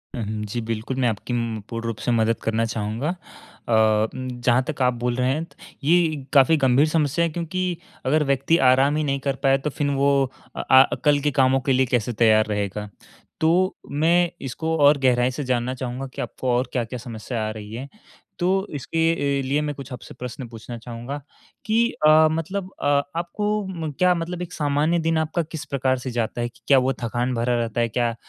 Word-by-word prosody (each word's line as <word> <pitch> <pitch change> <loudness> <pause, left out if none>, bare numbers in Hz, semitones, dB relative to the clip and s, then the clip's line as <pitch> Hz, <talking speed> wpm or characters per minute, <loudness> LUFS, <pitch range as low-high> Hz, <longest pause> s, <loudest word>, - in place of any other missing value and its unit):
हुँ, 120 - -3
हुँ, 105 0 -4
जी, 115 +3 -4
बिल्कुल 115 +3 -4
मैं 125 - +3
आपकी 110 +3 -4
उम, 115 -2 -2
पूर्ण 115 -1 -5
रूप 115 - -3
से 125 - +1
मदद 115 -1 +2
करना 115 +1 0
चाहूँगा। 115 +5 -3
अ 175 -8 -8 0.4
उम, 130 0 -5
जहाँ 120 +2 +3
तक 145 -3 -4
आप 125 0 +3
बोल 120 0 -2
रहे 125 0 +1
हैं, 155 +4 -2 0.4
ये 155 -2 +2
काफ़ी 145 +3 +6
गंभीर 135 +2 +4
समस्या 155 +1 +1
है 165 - -1
क्योंकि 175 +1 -2 0.3
अगर 150 +3 +3
व्यक्ति 140 +4 +2
आराम 135 +3 +4
ही 155 - 0
नहीं 140 -1 -1
कर 135 0 -1
पाए 135 0 +4
तो 150 +2 -3
फिर 145 +1 -2
वो 140 +1 +3 0.4
अ - - -3
अ, 130 0 +5
कल 145 -1 +5
के 145 0 +1
कामों 135 0 +3
के 135 - +3
लिए 130 +1 +3
कैसे 120 -1 0
तैयार 110 -1 +4
रहेगा। 105 0 -3 0.5
तो 180 +5 +2 0.2
मैं 170 +4 +3
इसको 160 +5 -2
और 145 0 +6
गहराई 125 -1 +3
से 145 +3 -4
जानना 125 -1 -1
चाहूँगा 130 +1 -5
कि - - -5
आपको 130 - -4
और 125 - -1
क्या-क्या 125 0 -2
समस्या 115 -1 -5
आ - - -2
रही 105 0 -9
हैं। 135 +3 -6 0.5
तो 190 +3 +1
इसके 155 -1 0
अ, - - -5
लिए 145 +2 +1
मैं 150 -1 -2 0.2
आपसे 125 - -9
प्रश्न 125 0 -6
पूछना 115 +1 -9
चाहूँगा 120 +4 -6 0.5
कि 230 +2 +2 0.2
अ, 155 +1 +7
मतलब 185 +4 -3
अ, - - -3 0.3
आपको 210 +5 -1
म 165 -5 -4
क्या 180 0 +5
मतलब 175 +1 -4
एक 180 0 -6
सामान्य 150 +3 +1
दिन 165 0 +1
आपका 160 +2 0
किस 155 -1 -7
प्रकार 135 -2 0
से 125 0 -5
जाता 120 0 -2
है 120 - -1
कि - - -25
क्या 140 - +6
वो 130 +1 +1
थकान 120 +2 -1
भरा 120 +1 +1
रहता 115 0 -1
है? 115 - +1
क्या 120 0 0
135 Hz, 205 wpm, -23 LUFS, 120-160 Hz, 0.5 s, अ